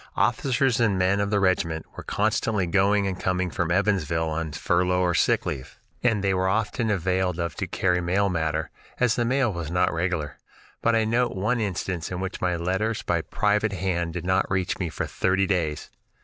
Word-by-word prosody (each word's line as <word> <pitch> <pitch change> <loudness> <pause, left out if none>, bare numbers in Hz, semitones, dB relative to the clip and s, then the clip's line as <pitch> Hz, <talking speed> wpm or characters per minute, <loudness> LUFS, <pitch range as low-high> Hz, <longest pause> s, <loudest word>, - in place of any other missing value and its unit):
Officers 130 +2 +2
and 110 -5 +2
men 95 +2 +2
of 100 0 0
the 105 -1 +2
regiment 90 -4 +1
were - - -6
constantly 105 -1 0
going 100 +3 +2
and 95 -2 -3
coming 90 -1 0
from 85 -1 -1
Evansville 85 -4 +1
on 80 0 -3
furlough 90 +4 +1
or 90 -1 +2
sick - - +2
leave, 65 - -5 0.2
and 110 -5 +1
they 95 -1 +2
were 95 0 +1
often 110 +3 0
availed 95 -2 0
of 85 -3 -2
to - - -4
carry 90 -1 +1
mail 95 +4 +1
matter, 80 -3 -1 0.3
as 125 -3 +3
the 120 - 0
mail 130 -2 +1
was 85 -3 -4
not 90 +2 +1
regular, 80 -4 -2 0.4
but 115 0 +3
I 110 -1 +2
note 120 +1 +1
one 110 +6 0
instance 95 -5 -2
in 90 - -4
which 95 0 -4
my 90 -1 +1
letters 95 +6 -1
by 85 -1 0
private 105 +4 0
hand 85 -3 -1
did 90 -1 -5
not 95 0 +1
reach 95 -1 -1
me 90 -3 -1
for - - -3
thirty 95 +1 +1
days. 85 -6 -1
95 Hz, 195 wpm, -25 LUFS, 85-105 Hz, 0.4 s, as